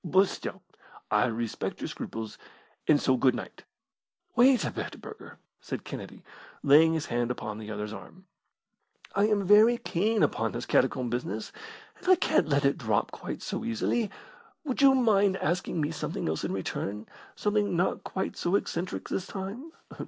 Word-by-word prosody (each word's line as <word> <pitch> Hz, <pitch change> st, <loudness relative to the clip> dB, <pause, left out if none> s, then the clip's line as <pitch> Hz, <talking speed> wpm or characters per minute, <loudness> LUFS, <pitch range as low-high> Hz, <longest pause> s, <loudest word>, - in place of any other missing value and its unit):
But 190 Hz, +3 st, +4 dB
still, -, -, -6 dB, 0.5 s
I -, -, +4 dB
respect 115 Hz, -1 st, -3 dB
your -, -, -3 dB
scruples; 110 Hz, -1 st, -6 dB, 0.5 s
and 150 Hz, -2 st, +5 dB
so 130 Hz, -1 st, +2 dB
good 130 Hz, 0 st, +3 dB
night!" -, -, -8 dB, 0.7 s
"Wait 250 Hz, +1 st, +5 dB
a -, -, -2 dB
bit, -, -, -6 dB
Burger," 435 Hz, -, -11 dB, 0.2 s
said -, -, -6 dB
Kennedy, -, -, -8 dB, 0.4 s
laying 155 Hz, +3 st, +6 dB
his 160 Hz, -2 st, -1 dB
hand 120 Hz, 0 st, -1 dB
upon 110 Hz, -3 st, -4 dB
the 110 Hz, -1 st, -8 dB
other's 105 Hz, 0 st, -4 dB
arm; 185 Hz, -, -11 dB, 0.9 s
"I 200 Hz, +1 st, +3 dB
am 210 Hz, -2 st, +2 dB
very 215 Hz, +5 st, +6 dB
keen 215 Hz, +2 st, +1 dB
upon 115 Hz, 0 st, 0 dB
this 120 Hz, +1 st, -4 dB
catacomb 125 Hz, -2 st, +1 dB
business, 110 Hz, -3 st, -3 dB, 0.5 s
and -, -, -12 dB
I 370 Hz, -, +9 dB
can't 310 Hz, -, +2 dB
let 140 Hz, 0 st, +2 dB
it 140 Hz, +4 st, +2 dB
drop 110 Hz, -6 st, 0 dB
quite -, -, -6 dB
so -, -, -3 dB
easily. 205 Hz, -, 0 dB, 0.5 s
Would 275 Hz, -4 st, -2 dB
you 270 Hz, -1 st, +7 dB
mind 205 Hz, -6 st, +3 dB
asking 175 Hz, +1 st, -1 dB
me 150 Hz, 0 st, 0 dB
something 165 Hz, -, -3 dB
else 80 Hz, 0 st, -2 dB
in -, -, -2 dB
return 105 Hz, +2 st, -3 dB, 0.3 s
something 205 Hz, -2 st, +1 dB
not 180 Hz, -, 0 dB
quite 190 Hz, -, -3 dB
so 175 Hz, +3 st, 0 dB
eccentric 180 Hz, -2 st, -2 dB
this 185 Hz, -, -3 dB
time?" 210 Hz, +11 st, -6 dB
165 Hz, 165 wpm, -28 LUFS, -, 0.9 s, I